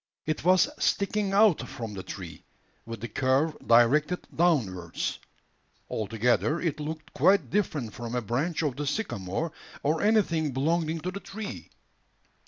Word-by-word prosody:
It 155 -1 -2
was 185 +1 +5 0.2
sticking 200 0 +1
out 195 - +4
from 115 -3 -6
the 95 - -5
tree, 90 -2 -8 0.4
with 115 -2 -6
the 120 - -3
curve 135 +6 +1
directed 145 +9 +4
downwards. 105 - 0 0.7
Altogether, 115 - +1
it 165 -4 -2
looked 155 +1 -6
quite 190 +8 +3
different 150 - -1
from 120 0 -5
a 125 - 0
branch 150 - -1
of 140 -4 -1
the 145 0 -3
sycamore, 150 - -2 0.3
or 155 +3 +1
anything 170 -9 +2
belonging 160 +4 0
to 180 - -3
the 195 - -6
tree. 200 +1 -7
150 Hz, 140 wpm, -28 LUFS, 120-175 Hz, 0.7 s, was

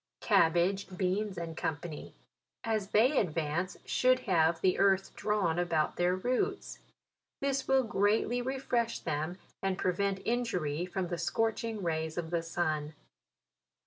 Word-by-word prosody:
CABBAGE, 180 +3 +2
BEANS, 190 +2 -1
&c. 165 -1 -4 0.5
as 215 -3 -1
they 245 +8 +4
advance, 165 0 -1
should 255 0 +3
have 165 -4 +2
the 185 +2 +2
earth 195 -1 +2
drawn, 190 -6 0
about 165 -3 0
their 175 +1 +2
roots. 255 - -2 0.6
This 275 -1 -1
will 265 0 +4
greatly 225 +2 +1
refresh 245 -2 -1
them, 155 +3 -3 0.2
and 195 -1 0
prevent 195 +2 0
injury 180 -9 -1
from 180 -1 -3
the 175 -2 -3
scorching 225 +3 -1
rays 160 -1 -2
of 165 -1 -3
the 170 -1 +1
sun. 155 -2 -2
185 Hz, 125 wpm, -31 LUFS, 165-225 Hz, 0.6 s, they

